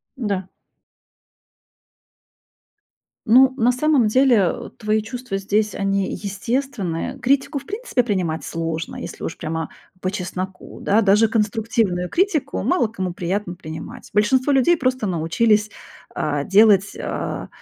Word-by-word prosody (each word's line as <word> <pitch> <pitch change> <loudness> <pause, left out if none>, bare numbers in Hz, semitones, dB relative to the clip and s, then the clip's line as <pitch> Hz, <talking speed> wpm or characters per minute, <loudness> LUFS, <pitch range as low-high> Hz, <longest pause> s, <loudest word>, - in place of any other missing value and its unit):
Да. 200 -7 -2 2.8
Ну, 260 +3 +6
на 245 0 +3
самом 260 -3 +2
деле, 255 +2 +4
э, 190 -5 0
твои 215 0 0
чувства 240 -2 -5
здесь, 210 +2 0
они 195 -1 0
естественные. 205 -3 -3
Критику, 275 +3 +1
в - - -6
принципе, 415 - -1
принимать 180 -7 -1
сложно, 165 0 -4
если - - -8
уж - - -4
прямо 160 0 -4 0.3
по 185 - -1
чесноку, 185 -1 -6
да. 210 +3 +3
Даже 210 +2 +4
конструктивную 210 -4 0
критику 325 -7 0
мало 355 -11 +2
кому 190 -5 -4
приятно 180 +1 -3
принимать. 160 -3 -9
Большинство 255 +7 +3
людей 270 +6 +4
просто 255 -6 -1
научились, 210 +6 +2 0.4
а, 145 -1 -1
делать, 205 0 +4
а, - - -4
210 Hz, 125 wpm, -21 LUFS, 185-250 Hz, 2.8 s, Ну